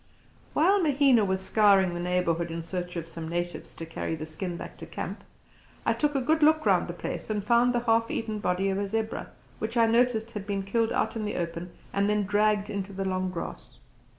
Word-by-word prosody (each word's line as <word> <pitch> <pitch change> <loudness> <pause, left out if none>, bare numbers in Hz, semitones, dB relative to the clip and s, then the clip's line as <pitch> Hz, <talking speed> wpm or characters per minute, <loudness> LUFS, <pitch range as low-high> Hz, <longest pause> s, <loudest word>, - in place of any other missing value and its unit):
While 380 +6 +4
Mahina 275 -7 +4
was 190 -1 0
scouring 195 -4 +4
the 175 - -4
neighbourhood 175 -1 0
in 165 0 -4
search 175 +1 -4
of 170 -2 -3
some 165 -1 -7
natives 175 +1 -3
to 165 - -6
carry 165 0 -3
the 155 0 -6
skin 170 +3 -5
back - - -8
to - - -9
camp, - - -6 0.6
I - - +3
took 295 -1 0
a 270 - +2
good 315 +4 +2
look 310 +1 +4
round - - +3
the - - -4
place - - -5
and 210 -2 -1
found 235 +2 +4
the 240 -1 0
half 230 -1 +2
eaten 220 -2 -2
body 190 0 0
of 195 0 0
a 200 - -1
zebra, 220 +2 -3 0.3
which 225 +2 -3
I 230 - +6
noticed 230 -1 +2
had 205 -3 -6
been 200 -1 -1
killed 225 +3 +1
out 220 - 0
in 220 - -2
the 210 - -3
open 170 0 -4 0.2
and 200 +1 +2
then 210 0 +2
dragged 210 +1 +2
into 200 -1 -4
the 195 0 -3
long 185 0 -1
grass. 175 -2 -7
205 Hz, 220 wpm, -28 LUFS, 180-230 Hz, 0.6 s, I